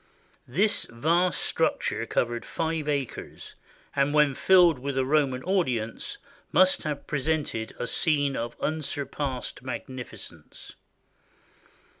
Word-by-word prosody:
This 195 Hz, -, +1 dB
vast 165 Hz, +10 st, +1 dB
structure -, -, 0 dB
covered 120 Hz, -1 st, 0 dB
five 160 Hz, -2 st, -2 dB
acres, 140 Hz, -4 st, -4 dB, 0.4 s
and 140 Hz, +1 st, +2 dB
when 150 Hz, -2 st, +5 dB
filled 175 Hz, -1 st, +5 dB
with 140 Hz, +1 st, -3 dB
a 130 Hz, -, +2 dB
Roman 135 Hz, -3 st, +2 dB
audience 130 Hz, -, -1 dB, 0.3 s
must 185 Hz, 0 st, +5 dB
have 150 Hz, -2 st, -3 dB
presented 145 Hz, -6 st, -1 dB
a -, -, -2 dB
scene 145 Hz, -1 st, +1 dB
of 120 Hz, +1 st, -4 dB
unsur 150 Hz, -2 st, -1 dB
passed 135 Hz, -2 st, -4 dB
magnificence. 130 Hz, 0 st, -8 dB
140 Hz, 110 wpm, -27 LUFS, 130-160 Hz, 0.4 s, when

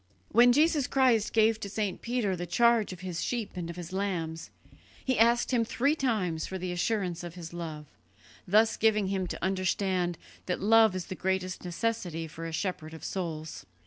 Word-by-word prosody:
When 240 Hz, +2 st, +6 dB
Jesus 300 Hz, 0 st, +3 dB
Christ 250 Hz, -6 st, +3 dB
gave 220 Hz, 0 st, +3 dB
to 200 Hz, -, -5 dB
St. 205 Hz, -2 st, -2 dB
Peter 235 Hz, -5 st, -1 dB
the 175 Hz, 0 st, -5 dB
charge 235 Hz, +3 st, +3 dB
of 180 Hz, -1 st, -9 dB
His 180 Hz, -3 st, -4 dB
sheep 235 Hz, -4 st, -2 dB
and 175 Hz, -2 st, -4 dB
of 170 Hz, -, -6 dB
His 175 Hz, 0 st, -8 dB
lambs, 170 Hz, -5 st, -3 dB, 0.6 s
He 260 Hz, -3 st, +1 dB
asked 235 Hz, +3 st, +4 dB
him 240 Hz, -2 st, +3 dB
three 275 Hz, +6 st, +1 dB
times 210 Hz, -, -1 dB
for 190 Hz, -, -4 dB
the 180 Hz, 0 st, -4 dB
assurance 180 Hz, -1 st, -1 dB
of 175 Hz, 0 st, -7 dB
his 170 Hz, -2 st, -8 dB
love, 160 Hz, -3 st, -6 dB, 0.6 s
thus 215 Hz, +4 st, +4 dB
giving 215 Hz, -3 st, +2 dB
him 190 Hz, -2 st, -1 dB
to -, -, -6 dB
understand 185 Hz, -2 st, 0 dB, 0.3 s
that 180 Hz, -, -1 dB
love 220 Hz, -1 st, +5 dB
is 185 Hz, -, -3 dB
the -, -, -6 dB
greatest 185 Hz, -1 st, -2 dB
necessity 180 Hz, -3 st, -2 dB
for 165 Hz, +1 st, -7 dB
a -, -, -5 dB
shepherd 160 Hz, -2 st, -3 dB
of 160 Hz, -, -12 dB
souls. 160 Hz, -4 st, -5 dB
190 Hz, 185 wpm, -29 LUFS, 175-225 Hz, 0.6 s, When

